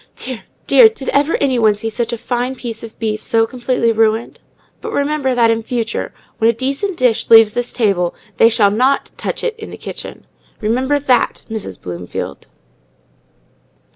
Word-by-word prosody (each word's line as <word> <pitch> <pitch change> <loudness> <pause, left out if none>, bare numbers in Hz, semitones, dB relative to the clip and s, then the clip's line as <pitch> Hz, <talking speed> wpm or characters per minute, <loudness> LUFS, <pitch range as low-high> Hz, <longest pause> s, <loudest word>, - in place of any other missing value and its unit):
Dear—dear! 265 - +3
Did 285 -12 -7
ever 290 +3 +2
any 260 -3 +1
one 215 -2 +4
see 225 +2 -4
such 230 +1 -2
a 235 - -3
fine 245 +3 -2
piece 230 -3 -6
of 225 -1 -10
beef 215 -1 -2
so 225 0 +2
completely 240 -1 0
ruined? 225 +1 0 0.4
But - - -6
remember 285 -2 0
that, 230 -2 +4
in 225 0 0
future, 230 0 -3 0.3
when 225 0 +4
a - - +3
decent 275 - -2
dish 245 -3 +1
leaves 225 -2 +7
this 245 0 -2
table, 195 -7 0 0.2
they 225 - +6
shall 215 -3 +3
not 255 +6 +1
touch - - -4
it 485 - 0
in 440 - -8
the - - -9
kitchen. - - -8 0.3
Remember 255 +6 +1
that, 265 -3 +1
Mrs. 210 - -5
Bloomfield!" 85 -5 -6
235 Hz, 170 wpm, -17 LUFS, 220-260 Hz, 0.4 s, leaves